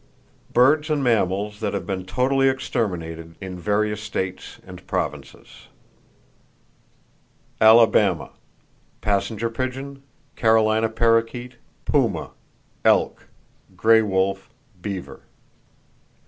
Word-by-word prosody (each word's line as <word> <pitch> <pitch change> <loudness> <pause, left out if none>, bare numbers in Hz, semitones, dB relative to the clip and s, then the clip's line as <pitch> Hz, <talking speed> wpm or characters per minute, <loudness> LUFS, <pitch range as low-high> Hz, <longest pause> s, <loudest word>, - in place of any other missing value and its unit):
Birds 150 +5 +4
And 150 -2 0
Mammals 105 -3 0
That 105 - -2
Have - - -4
Been 95 -2 -4
Totally 135 +5 +2
Exterminated 85 -10 -3
In 95 -2 -7
Various 105 +2 0
States 95 -3 -5
And - - -12
Provinces - - -5 2.0
Alabama: 115 0 +4 0.7
Passenger 105 +3 -1
pigeon, 130 +3 -5 0.3
Carolina 110 0 +3
parrakeet; 115 +2 0 0.3
puma, - - 0 0.5
elk, - - +2 0.5
gray 110 0 +5
wolf, 95 -1 -1 0.3
beaver. 95 -2 -6
110 Hz, 85 wpm, -23 LUFS, 95-120 Hz, 2.0 s, gray